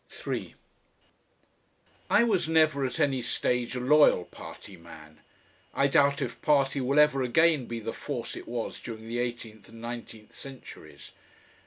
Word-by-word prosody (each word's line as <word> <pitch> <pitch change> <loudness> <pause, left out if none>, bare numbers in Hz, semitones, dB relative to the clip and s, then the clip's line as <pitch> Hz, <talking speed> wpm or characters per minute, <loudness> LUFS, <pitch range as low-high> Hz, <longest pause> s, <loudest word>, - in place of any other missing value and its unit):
3 - - -5 1.5
I - - +5
was 195 -8 +1
never 155 -3 +3
at 125 - -6
any 135 -3 +1
stage 125 +1 -1
a - - -2
loyal 135 -8 +4
party 100 - -11
man. 80 -2 -14 0.6
I 140 - +3
doubt 140 0 +3
if 120 - -6
party 140 -2 +2
will 135 +3 0
ever 150 -2 +5
again 145 +2 +3
be 115 -1 -4
the 115 0 -5
force 120 -6 -5
it - - -9
was 120 -1 -4
during 110 -1 -8
the 120 +1 -3
eighteenth 120 -3 -5
and 115 - -13
nineteenth 115 -2 -8
centuries. 135 -2 -11
125 Hz, 150 wpm, -28 LUFS, 115-140 Hz, 1.5 s, I